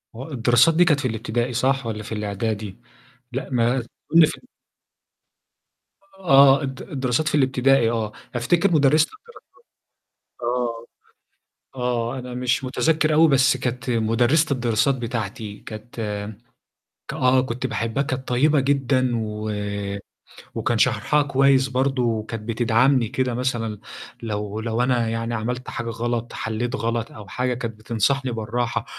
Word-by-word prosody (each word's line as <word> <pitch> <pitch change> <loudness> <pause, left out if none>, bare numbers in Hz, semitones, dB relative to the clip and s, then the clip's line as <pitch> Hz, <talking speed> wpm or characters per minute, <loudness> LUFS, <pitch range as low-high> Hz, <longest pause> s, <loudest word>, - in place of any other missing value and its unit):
هو 130 +6 -8
الدراسات 125 +4 +4
دي 175 +2 +5
كانت 150 -4 +3
في 130 - -1
الابتدائي 120 +2 -2
صح 135 +2 +1
والّا 110 -1 -4
في 115 - -10
الإعدادي؟ 105 -1 -3 0.5
لأ، 130 +3 -4
ما 120 +1 +2
تقول 115 -1 -8 0.3
لي - - +9
فن - - -7 1.8
آه، 135 -6 +6
الد 135 -1 -5
الدراسات 135 +2 -1
في 150 - +1
الابتدائي 130 -3 +3
آه، 110 -2 -2 0.2
أفتكر 175 +10 +2
مُدرِّسة 150 0 +4
الدراسات 465 +2 -17 1.0
آه. 120 -1 -2 0.9
آه، 125 0 -1
أنا 125 -1 -7
مش 125 +1 0
مُتذكّر 155 +4 +1
أوي 160 +1 +6
بس 130 -2 +4
كانت 125 0 -3
مُدرِّسة 120 +7 +2
الدراسات 120 +1 +1
بتاعتي 110 -4 -5
كانت 110 +2 -10
م 105 -1 -4 0.8
ك - - -5
آه، 130 0 +3
كنت 130 0 -3
باحبها 115 +2 -1
كانت 130 -1 -4
طيبة 145 +4 +3
جدًا 135 -2 +1
و 110 -1 -3 1.1
وكان - - 0
شرحها 150 0 +2
كويس 135 -1 +3
برضه 130 0 0
وكانت 115 -1 -2
بتدعمني 120 +2 +3
كده 130 +2 -1
مثلًا 115 -4 -2 0.4
لو 105 -1 -4
لو 115 +1 -1
أنا 120 -3 +1
يعني 115 +1 -3
عملت 125 +3 -3
حاجة 120 -1 -4
غلط، 120 +1 -3
حلّيت 115 +3 -3
غلط 115 0 -2
أو 105 -2 -11
حاجة، 125 +6 -1
كانت 115 -3 -5
بتنصحني 125 +5 0
بالراحة، 115 +1 -2
125 Hz, 140 wpm, -23 LUFS, 115-135 Hz, 1.8 s, لي